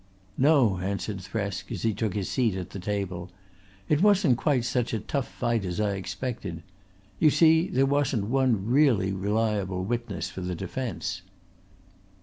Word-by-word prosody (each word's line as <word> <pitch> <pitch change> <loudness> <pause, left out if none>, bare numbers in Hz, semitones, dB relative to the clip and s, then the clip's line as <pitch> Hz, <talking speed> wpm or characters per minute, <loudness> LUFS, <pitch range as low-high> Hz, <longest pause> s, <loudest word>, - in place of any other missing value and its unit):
"No," 130 - +4
answered 100 +1 -3
Thresk 100 -1 -4
as - - -4
he 110 -1 +2
took 105 0 -2
his 100 -3 -2
seat 115 -7 +1
at 90 -2 -5
the 100 - -6
table. 95 -2 -3 0.6
"It 150 +1 +2
wasn't 200 -9 +5
quite 135 -6 +1
such 120 -1 0
a - - -1
tough 135 +5 -2
fight 120 -3 -1
as 90 +1 -3
I 105 -1 +1
expected. 95 -3 -5 0.6
You 155 - +6
see 160 +3 +5
there 135 -8 +2
wasn't 135 -6 +1
one 120 -4 +1
really 120 -7 +3
reliable 100 -2 -1
witness 115 +1 -3
for 95 - -7
the 90 0 -3
defence." 100 -1 -4
110 Hz, 155 wpm, -27 LUFS, 95-130 Hz, 0.6 s, You